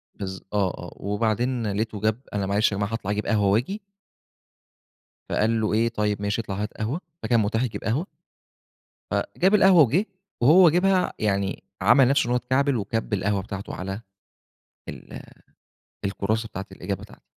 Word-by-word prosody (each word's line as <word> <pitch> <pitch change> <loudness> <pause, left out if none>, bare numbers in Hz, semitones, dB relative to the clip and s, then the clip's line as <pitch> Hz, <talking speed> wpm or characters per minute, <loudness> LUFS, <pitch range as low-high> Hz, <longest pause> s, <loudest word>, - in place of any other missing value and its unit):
بالض 95 -1 -6
آه 100 -2 +2
آه. 90 - -9
وبعدين 110 +4 -1
لقيته 105 +1 -2
جاب 110 +3 0
"أنا 100 -1 -1
معلش 100 +3 +2
يا 100 - -2
جماعة، 100 +2 -2
هاطلع 105 -3 -2
أجيب 105 +1 -2
قهوة 105 -3 +2
وآجي." 130 - 0 1.5
فقال 110 +1 +1
له 105 - 0
إيه: 115 +2 +2
"طيب 105 -2 -1
ماشي، 105 +2 -1
اطلع 100 -3 -5
هات 105 +2 -4
قهوة." 120 +11 -2 0.2
فكان 120 -2 +3
متاح 110 +3 +1
يجيب 125 - -4
قهوة. 130 +11 0 1.1
فجاب 190 +4 +2
القهوة 190 -4 +7
وجِه 150 - +2 0.4
وهو 170 +7 +8
جايبها 180 +3 +2
يعني 100 -2 -1 0.2
عمل 135 -3 +6
نَفْسه 140 -1 +3
إن - - -4
هو 125 - +2
اتكعبل 130 +3 +1
وِكَب 110 +1 -3
القهوة 100 0 0
بتاعته 100 0 -6
على 95 +3 -5 0.9
ال - - -9 0.8
الكُرّاسة 110 +3 -1
بتاعة 95 -2 -6
الإجابة - - -5
بتاعتي. - - -14
110 Hz, 160 wpm, -25 LUFS, 100-125 Hz, 1.5 s, وهو